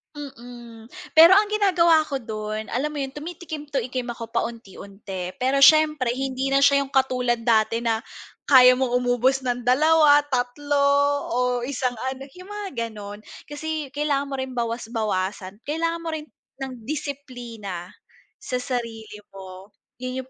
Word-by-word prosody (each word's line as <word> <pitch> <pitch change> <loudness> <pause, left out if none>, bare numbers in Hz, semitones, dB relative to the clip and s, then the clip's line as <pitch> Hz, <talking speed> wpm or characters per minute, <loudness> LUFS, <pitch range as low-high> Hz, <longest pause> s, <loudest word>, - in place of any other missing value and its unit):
Mm, 240 -5 -11 0.2
pero 335 +4 +8
ang 415 +1 +3
ginagawa 360 -6 +4
ko 280 - -4
do'n, 215 -3 -5
alam 265 +6 0
mo 295 -2 -4
yun 270 - -5
tumitikim 310 0 -8
tikim 255 -2 -3
ako 230 -1 -8
paunti-unti 195 -4 -5
pero 265 +4 +1
siyempre 305 -2 +5
hindi 265 0 -2
na 275 +1 +3
siya 280 0 +5
yung 280 - -2
katulad 255 -3 +1
dati 230 0 +2
na 225 -1 +1 0.5
kaya 255 -2 +7
mong 245 -2 0
umubos 250 +2 +1
ng 245 -1 -3
2, 295 +2 +5
3 285 +2 -1 0.6
o - - 0 0.3
isang 250 -4 -2
ano 265 0 -5
yung 365 +4 -13
mga 415 -1 -6 0.2
gano'n. 205 -1 -9 0.3
Kasi 305 0 -4
kailangan 285 -1 -1
mo - - -2
rin 260 -1 -4
bawas-bawasan, 215 -5 -3
kailangan 330 +2 -1
mo 335 - -8
rin 305 - -6 0.4
ng 265 -1 -5
disiplina 245 - -6 0.5
sa 425 - -5
sarili 230 -4 -5 0.2
mo, 190 0 -10 0.3
yun 255 +1 -4
yung 260 - -22
255 Hz, 145 wpm, -23 LUFS, 230-290 Hz, 0.6 s, pero